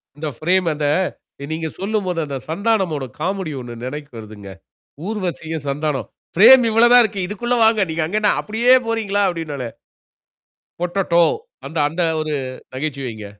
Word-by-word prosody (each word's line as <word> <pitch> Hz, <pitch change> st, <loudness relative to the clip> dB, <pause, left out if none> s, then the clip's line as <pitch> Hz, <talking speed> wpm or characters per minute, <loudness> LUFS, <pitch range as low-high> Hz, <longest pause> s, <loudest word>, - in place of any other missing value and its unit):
இந்த 155 Hz, +1 st, -5 dB
ஃப்ரேம் 180 Hz, +4 st, +1 dB
அந்த 150 Hz, 0 st, -3 dB, 0.7 s
நீங்க 160 Hz, 0 st, -2 dB
சொல்லும்போது 195 Hz, -4 st, -1 dB
அந்தச் 140 Hz, -3 st, -6 dB
சந்தானமோட 190 Hz, -7 st, 0 dB
காமெடி 185 Hz, -1 st, -2 dB
ஒண்ணு 120 Hz, -1 st, -8 dB
நினைக்கு 145 Hz, +2 st, -6 dB
வருதுங்க. 105 Hz, -2 st, -10 dB, 0.6 s
ஊர்வசியும், 175 Hz, -7 st, -4 dB
சந்தானம் 140 Hz, -4 st, -2 dB, 0.3 s
ஃப்ரேம் 245 Hz, +7 st, +8 dB
இவ்வளவுதான் 240 Hz, +2 st, +7 dB
இருக்கு. 205 Hz, -2 st, -2 dB
இதுக்குள்ள 240 Hz, +5 st, -1 dB
வாங்க. 220 Hz, -1 st, +4 dB
நீங்க 160 Hz, 0 st, -1 dB
அங்கே 215 Hz, +4 st, 0 dB, 0.2 s
அப்படியே 230 Hz, +4 st, +2 dB
போறீங்களா? 215 Hz, -3 st, 0 dB
அப்படின்னுவானே. 150 Hz, -8 st, -4 dB, 1.1 s
பொட்டேட்டோ 175 Hz, -1 st, +2 dB, 0.4 s
அந்த 165 Hz, -, -6 dB
அந்த 165 Hz, +4 st, -3 dB, 0.2 s
ஒரு 155 Hz, -1 st, -3 dB, 0.4 s
நகைச்சுவைங்க. 130 Hz, -6 st, -4 dB
170 Hz, 125 wpm, -20 LUFS, 150-210 Hz, 1.1 s, ஃப்ரேம்